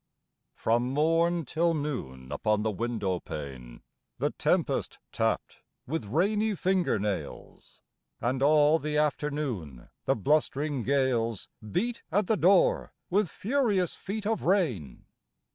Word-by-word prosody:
From 120 +2 +1
morn 165 +3 +2
till 165 +5 +1
noon 70 - -4
upon 105 -1 0
the 110 - +1
window 105 -4 -2
pane 65 -7 -8 0.3
The - - 0
tempest - - 0
tapped - - -1 0.2
with 135 -5 -3
rainy 205 - +1
finger 185 - +1
nails, 100 -1 -5 0.4
And 130 +3 -1
all 150 +2 +5
the 150 0 -2
afternoon 145 - -2 0.2
the 135 - +2
blustering 145 +2 +1
gales 120 -5 0 0.2
Beat 235 - -1
at 205 +4 +2
the 220 - +2
door 190 0 +3 0.2
with 200 -1 +2
furious 210 - 0
feet 210 +2 -5
of 220 0 0
rain. 145 - 0
150 Hz, 120 wpm, -28 LUFS, 110-175 Hz, 0.4 s, all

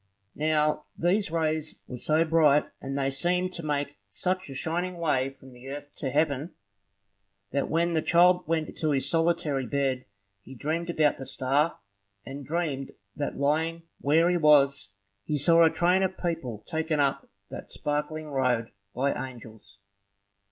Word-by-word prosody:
Now, 150 0 +1
these 185 +4 +2
rays 155 -1 -1
were 125 - -6
so 155 +6 +2
bright, 155 -3 +4 0.2
and 135 +1 -4
they 135 -1 0
seemed 180 +6 +1
to 170 - -4
make 145 -1 -2
such 185 - -2
a 135 - -7
shining 175 +6 -2
way 140 -6 +1
from 135 -1 -16
earth 140 +3 -8
to 135 - -2
heaven, 150 +2 0 1.0
that 140 +1 -1
when 170 +2 +1
the 160 - +2
child 180 +1 +4
went 160 -1 -1
to 155 - 0
his 140 -2 +1
solitary 165 -5 +1
bed, 135 -1 -1 0.4
he 130 +6 -12
dreamed 160 +6 -2
about 155 -3 +2
the 135 - -7
star; 140 +5 +1 0.5
and 140 +1 -7
dreamed 150 -5 -2 0.2
that, 145 - -3
lying 160 +4 0 0.2
where 160 +4 +3
he 180 - +2
was, 140 -9 +4 0.3
he 150 - -1
saw 165 +4 +5
a 165 - +6
train 180 +3 +2
of 190 0 -1
people 150 - -3
taken 160 -2 -1
up 140 -1 0 0.2
that - - -8
sparkling 150 +1 -2
road 125 -4 0 0.2
by 135 +3 +1
angels. 110 -5 -9
150 Hz, 155 wpm, -27 LUFS, 135-165 Hz, 1.0 s, a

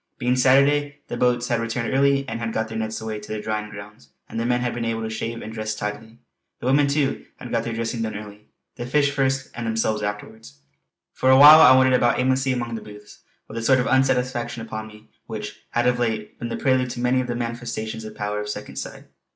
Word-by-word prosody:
Being 125 +1 +1
Saturday 145 +3 +3
the - - -3
boats 120 0 +1
had 120 -1 +1
returned 115 +1 -2
early 140 0 +2
and 115 - -4
had 115 -1 -3
got 110 0 -2
their 110 - -5
nets 110 0 -3
away 110 -1 -5
to 105 - -10
the 110 - -3
drying 105 0 -3
grounds, 100 -8 -12 0.2
and - - -5
the 115 - -1
men 120 0 +1
had 125 -1 -1
been 120 - -3
able 115 -1 -2
to 110 - -4
shave 115 +1 -4
and 110 - -7
dress 110 -1 -3
tidily. 110 +2 -6 0.4
The - - -8
women, 140 +3 +4
too, 140 -1 -1
had - - -10
got - - 0
their 115 - -3
dressing 115 0 -3
done 110 -1 -3
early 105 0 -11 0.3
the 120 - -5
fish 140 +2 +2
first 135 -1 -1
and 120 -1 -5
themselves 110 -1 0
afterwards. 105 -6 -6 0.6
For 130 - +1
awhile 145 +4 +10
I 130 -4 +8
wandered 130 0 +4
about 120 -1 +2
aimlessly 130 +1 +1
amongst 120 -2 -3
the - - -8
booths, 105 0 -13 0.3
with - - -11
that 115 - -3
sort 130 +3 +4
of 125 - 0
unsatisfaction 125 -3 0
upon 110 -1 -6
me 105 0 -16 0.2
which 105 -2 -6
had 120 +1 0
of 125 0 +2
late 110 -3 -2
been 120 - -4
the - - -3
prelude 130 -1 +1
to 120 - -6
many 125 +1 +2
of 125 - -5
the 120 - -2
manifestations 115 -2 -4
of 110 0 -8
the - - -20
power 105 0 -2
of 105 - -6
Second - - -7
Sight. - - -6
115 Hz, 240 wpm, -23 LUFS, 110-130 Hz, 0.6 s, awhile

